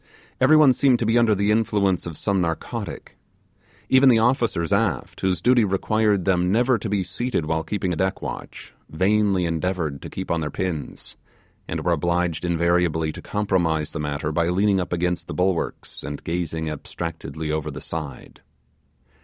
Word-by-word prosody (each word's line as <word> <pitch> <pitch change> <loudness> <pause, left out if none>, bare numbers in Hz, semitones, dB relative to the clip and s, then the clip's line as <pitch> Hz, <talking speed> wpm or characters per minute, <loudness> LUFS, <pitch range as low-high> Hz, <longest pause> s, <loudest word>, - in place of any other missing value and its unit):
Every 145 +4 +6
one 145 -4 +6
seemed 130 -2 +3
to 115 - -2
be 115 +2 +2
under 115 -3 +4
the 100 +2 +1
influence 105 -5 +1
of 80 -3 -7
some 100 +1 0
narcotic. 80 -2 -4 0.7
Even 130 +1 +6
the 120 - +6
officers 115 -7 +1
aft, 100 - -1
whose 90 -3 0
duty 125 -1 +5
required 105 0 +1
them 90 -1 +2
never 120 +2 +3
to 105 - -4
be 100 -2 0
seated 120 -4 -2
while 80 0 -1
keeping 90 +2 -2
a - - -2
deck 95 +3 -1
watch, - - -7 0.2
vainly 95 +2 +2
endeavoured 85 -3 -2
to - - -8
keep 95 - -5
on 85 -1 0
their 75 - -2
pins; 85 -5 -5 0.5
and 80 -1 -4
were 90 - +2
obliged 85 0 0
invariably 85 -2 +1
to - - -9
compromise 85 -7 0
the - - -5
matter 75 0 -2
by 85 +2 +1
leaning 95 +2 +2
up 90 - -3
against 90 0 -1
the - - -6
bulwarks, 90 -1 -2
and 75 0 -6
gazing 80 -2 -3
abstractedly 80 +1 -5
over 75 -1 -2
the - - -7
side. 75 -5 -7
90 Hz, 170 wpm, -23 LUFS, 80-105 Hz, 0.7 s, Every